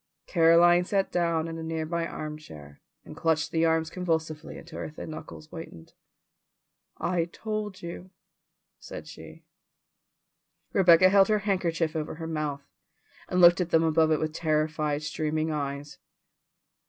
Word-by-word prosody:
Caroline 175 +1 +5
sat 195 +1 0
down 170 -2 0
in 165 0 -6
a - - -5
nearby 165 +1 -2
armchair, 115 - -9 0.2
and - - -10
clutched 160 -1 0
the 165 0 +2
arms 160 0 +1
convulsively 160 -3 -3
until 170 -1 -10
her - - -4
thin 155 +1 -8
knuckles 155 0 -9
whitened. 155 - -10 1.0
"I 175 -2 0
told 210 +1 -5
you," 170 +2 -7 0.7
said - - -9
she. - - -12 1.3
Rebecca 185 -1 +6
held 195 0 +5
her 215 - +3
handkerchief 170 -5 0
over 155 -1 -3
her 165 0 -7
mouth, 150 -3 -3 0.6
and 180 - 0
looked 175 +1 +7
at 175 - -2
them 165 -1 +4
above 160 0 +3
it 155 - +2
with 155 0 -2
terrified, 155 -2 0
streaming 155 +1 -1
eyes. 145 -1 -4
160 Hz, 140 wpm, -27 LUFS, 155-175 Hz, 1.3 s, looked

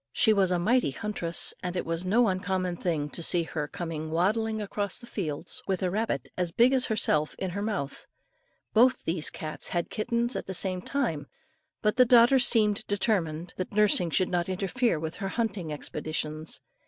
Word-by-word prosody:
She 220 - +4
was 195 -3 +3
a 180 - +1
mighty 230 - +2
huntress, 170 +1 -2
and 180 0 -4
it - - -2
was 165 +1 -2
no 225 +6 +3
uncommon 185 -1 -1
thing, 160 -4 -1
to - - -5
see 170 +1 +3
her 155 -2 -4
coming 160 -1 -5
waddling 215 +7 0
across 205 -1 -3
the - - -11
fields 160 -11 -1
with 190 -1 -1
a 180 - 0
rabbit 220 +4 -1
as 180 -2 -1
big 240 +8 +4
as 260 -1 +3
herself 155 -8 +1
in 190 -2 -3
her 200 +3 -4
mouth. 200 -10 -3 0.7
Both 250 +4 +4
these 160 -1 +1
cats 155 -1 -5
had 175 -1 -2
kittens 235 +2 -1
at - - -4
the 190 - -2
same 185 0 0
time, 180 - -2 0.6
but 210 +1 +1
the 250 - +7
daughter 240 +2 +6
seemed 220 -4 +4
determined, 180 -5 -1
that 185 - -4
nursing 200 -4 +3
should 180 +3 +1
not 175 0 -1
interfere 195 +1 0
with 160 +1 -5
her 195 - -3
hunting 200 -8 -2
expeditions. 155 +1 -5
185 Hz, 185 wpm, -28 LUFS, 165-220 Hz, 0.7 s, the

